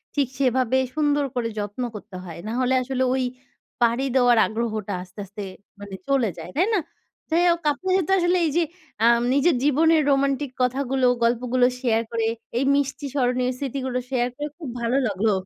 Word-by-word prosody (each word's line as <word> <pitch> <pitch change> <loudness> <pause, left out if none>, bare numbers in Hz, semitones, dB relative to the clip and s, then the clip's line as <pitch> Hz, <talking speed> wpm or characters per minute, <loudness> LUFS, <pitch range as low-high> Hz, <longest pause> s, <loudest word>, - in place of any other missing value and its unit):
ঠিক 280 -3 +2
সেইভাবে 260 -1 +2 0.2
সুন্দর 290 -2 +2
করে 235 -2 0
যত্ন 205 +4 -4
করতে 205 -2 -10
হয়। 170 -2 -9
না - - -3
হলে 255 +1 +2
আসলে 260 0 -1
ওই 260 -1 0 0.6
পাড়ি 240 +3 +2
দেওয়ার 245 -2 +5
আগ্রহটা 215 -3 -3
আস্তে, 185 +3 -15
আস্তে 200 +2 -9 0.4
মানে 200 -1 -8
চলে 265 -6 +2
যায়, 165 - -8
তাই 355 +5 +3
না? 405 - +3 0.5
যাই 335 +2 +3
হোক 340 0 -1
আপনার 370 +5 -2
সাথে 380 +2 0
আসলে 350 +1 +2
এই - - +1
যে - - +4 0.4
আম 235 0 +5
নিজের 285 +2 +3
জীবনের 315 +2 +4
রোমান্টিক 275 0 +1
কথাগুলো, 260 +1 +1 0.2
গল্পগুলো 245 +1 +2
share 230 -3 +1
করে 230 -1 0 0.3
এই 265 - +2
মিষ্টি 285 +1 -1
স্মরণীয় 250 -1 +1
স্মৃতিগুলো 260 -2 -3
share 250 -2 0
করে 295 0 -3
খুব 295 -6 -6
ভালো 235 +3 +1
লাগলো। 210 +2 +1
255 Hz, 175 wpm, -23 LUFS, 230-280 Hz, 0.6 s, দেওয়ার